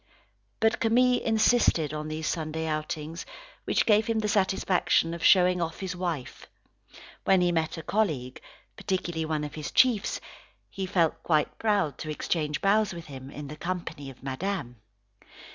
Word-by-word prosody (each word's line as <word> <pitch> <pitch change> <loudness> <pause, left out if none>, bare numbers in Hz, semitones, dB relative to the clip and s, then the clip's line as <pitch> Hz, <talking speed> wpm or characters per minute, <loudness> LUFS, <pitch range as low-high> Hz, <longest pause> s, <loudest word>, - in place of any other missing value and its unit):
But 220 +2 +2
Camille 245 +2 +3
insisted 220 - +3
on 155 0 -4
these 155 +1 -4
Sunday 160 0 -2
outings, 155 +1 -3 0.4
which - - +2
gave 215 0 +4
him 230 -1 0
the 215 -1 0
satisfaction 190 -4 +2
of 170 - -6
showing 180 -1 +5
off 165 -1 -3
his 185 -2 -4
wife. 170 -7 -4 0.8
When 190 -1 +4
he 175 0 +3
met 165 0 -1
a 165 - -6
colleague, 155 -13 -1 0.3
particularly 175 -4 -2
one 155 -1 -1
of 150 0 -5
his 155 -1 -5
chiefs, 245 -6 +3 0.5
he 190 -1 -4
felt 170 -4 +1
quite 155 -3 0
proud 205 - +1
to 155 - -5
exchange 150 0 -2
bows 205 0 +3
with 170 -1 -8
him, 135 -2 -9
in 145 0 -8
the 150 - -7
company 170 -4 -5
of 135 - -14
Madame. 135 -2 -3
170 Hz, 160 wpm, -27 LUFS, 155-195 Hz, 0.8 s, showing